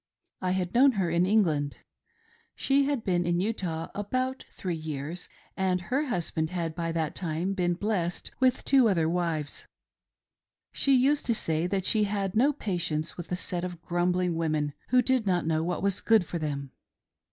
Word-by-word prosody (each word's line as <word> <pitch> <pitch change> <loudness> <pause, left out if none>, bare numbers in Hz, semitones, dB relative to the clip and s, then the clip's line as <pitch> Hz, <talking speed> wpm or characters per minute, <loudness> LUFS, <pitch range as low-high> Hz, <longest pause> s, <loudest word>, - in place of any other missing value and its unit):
I 185 0 0
had 180 -2 -2
known 265 +2 +6
her 190 -5 0
in 170 +2 +2
England 160 -9 +2 0.4
— - - -38 0.3
she 275 0 +2
had 280 -5 -1
been 175 -2 +1
in 175 0 +1
Vtah 180 -5 -2
about 255 +6 -2
three 180 -2 -4
years, 155 +2 -5 0.3
and 185 -1 +1
her 260 - -1
husband 165 -7 -1
had 170 -2 -3
by 165 0 -2
that 160 -2 -1
time 175 +2 -2
been 175 -2 0
blessed 180 -3 -2
with 260 -1 +2
two 265 -4 +5
other 165 -5 +2
wives. 165 -4 -2 1.1
She 275 -1 +3
used 275 +3 +2
to 235 - +2
say 160 -3 0
that 190 0 -1
she 215 -2 +3
had 200 -2 -2
no 265 +7 +4
patience 175 - -2
with 175 -1 -8
a - - +1
set 180 -1 -3
of 180 -2 -5
grumbling 180 0 +1
women 155 -3 0
who 250 0 +4
did 255 -3 +1
not 180 -3 +1
know 160 0 +1
what 175 +2 -2
was 200 -1 0
good 220 -5 +4
for 170 - -4
them. 140 -3 -4
180 Hz, 180 wpm, -28 LUFS, 165-215 Hz, 1.1 s, known